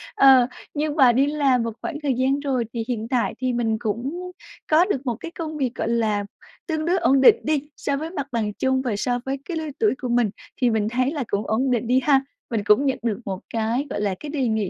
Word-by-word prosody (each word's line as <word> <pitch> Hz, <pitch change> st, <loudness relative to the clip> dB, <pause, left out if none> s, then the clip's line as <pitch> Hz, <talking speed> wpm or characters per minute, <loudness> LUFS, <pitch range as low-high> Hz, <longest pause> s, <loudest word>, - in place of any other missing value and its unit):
Ờ, 265 Hz, -3 st, +7 dB, 0.3 s
nhưng 300 Hz, 0 st, -1 dB
mà 265 Hz, -5 st, +6 dB
đi 260 Hz, +4 st, +3 dB
làm 280 Hz, -5 st, +2 dB
một 230 Hz, -, -2 dB
khoảng 295 Hz, -, -4 dB
thời 280 Hz, -2 st, +1 dB
gian 265 Hz, +3 st, +1 dB
rồi 265 Hz, -4 st, -1 dB
thì 230 Hz, -, -2 dB
hiện 225 Hz, -3 st, -3 dB
tại 250 Hz, -1 st, 0 dB
thì 255 Hz, -1 st, 0 dB
mình 225 Hz, -2 st, 0 dB
cũng 270 Hz, -, -3 dB, 0.4 s
có 320 Hz, +3 st, +6 dB
được 285 Hz, -9 st, -2 dB
một 240 Hz, -3 st, -1 dB
cái 330 Hz, +9 st, -8 dB
công 315 Hz, -2 st, -5 dB
việc, 260 Hz, -3 st, -1 dB
gọi -, -, -2 dB
là, 215 Hz, -3 st, +1 dB, 0.4 s
tương 315 Hz, -2 st, -1 dB
đối 355 Hz, +2 st, +2 dB
ổn 275 Hz, -6 st, +3 dB
định 265 Hz, -, +8 dB
đi 295 Hz, -1 st, -1 dB
so 280 Hz, -1 st, -1 dB
với 315 Hz, +3 st, -4 dB
mặt 285 Hz, -6 st, -4 dB
bằng 220 Hz, -3 st, -1 dB
chung 260 Hz, +4 st, 0 dB
và 245 Hz, -5 st, -2 dB
so 245 Hz, +4 st, -1 dB
với 270 Hz, +1 st, -2 dB
cái 345 Hz, -, -4 dB
lứa 315 Hz, -1 st, -3 dB
tuổi 435 Hz, -, +3 dB
của 250 Hz, -, -3 dB
mình, 240 Hz, -2 st, +2 dB, 0.3 s
thì 250 Hz, -, +4 dB
mình 220 Hz, -2 st, +1 dB
thấy 255 Hz, +3 st, 0 dB
là 295 Hz, -4 st, -2 dB
cũng 200 Hz, +1 st, -2 dB
ổn 255 Hz, +4 st, +1 dB
định 240 Hz, -1 st, 0 dB
đi 255 Hz, +2 st, +4 dB
ha. 275 Hz, 0 st, +4 dB, 0.3 s
Mình 225 Hz, -3 st, -1 dB
cũng 210 Hz, +7 st, +4 dB
nhận 265 Hz, -, +1 dB
được 225 Hz, -3 st, -1 dB
một 190 Hz, -2 st, -4 dB
cái, 230 Hz, +5 st, 0 dB
gọi -, -, -3 dB
là, 200 Hz, -2 st, 0 dB
cái 300 Hz, -, -7 dB
đề 280 Hz, -4 st, -1 dB
nghị 220 Hz, -4 st, 0 dB
255 Hz, 255 wpm, -23 LUFS, 230-290 Hz, 0.4 s, định